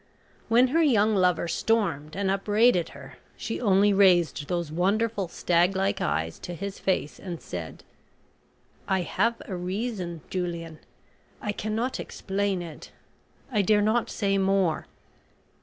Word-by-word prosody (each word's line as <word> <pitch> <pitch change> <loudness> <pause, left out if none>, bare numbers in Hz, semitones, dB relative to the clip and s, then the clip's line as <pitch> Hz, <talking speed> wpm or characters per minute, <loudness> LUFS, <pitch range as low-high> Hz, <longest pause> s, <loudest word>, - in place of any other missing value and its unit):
When 245 +3 +4
her 325 +5 +3
young 220 -8 +4
lover 180 -2 +2
stormed 170 -8 0
and 195 0 0
upbraided 205 -1 +3
her - - -12 0.2
she 225 - -4
only 200 -2 +4
raised 175 -6 +3
those 170 -3 -2
wonderful 200 +4 0
stag 175 +2 +1
like 195 +1 0
eyes 80 - -1
to 175 - -6
his 200 +3 -6
face 185 -6 -1
and 175 -3 -6
said: 85 -3 -7 1.0
"I 190 -1 +1
have 230 +7 0
a 190 - -5
reason, 180 -2 -4
Julian. 170 -3 -4 0.6
I 210 - -2
cannot 220 +5 -2
explain 195 -2 -2
it. 165 -3 -10 0.6
I 210 -4 +2
dare 205 +1 +3
not 220 +2 +1
say 195 -2 0
more. 190 -4 +1
195 Hz, 135 wpm, -26 LUFS, 175-215 Hz, 1.0 s, When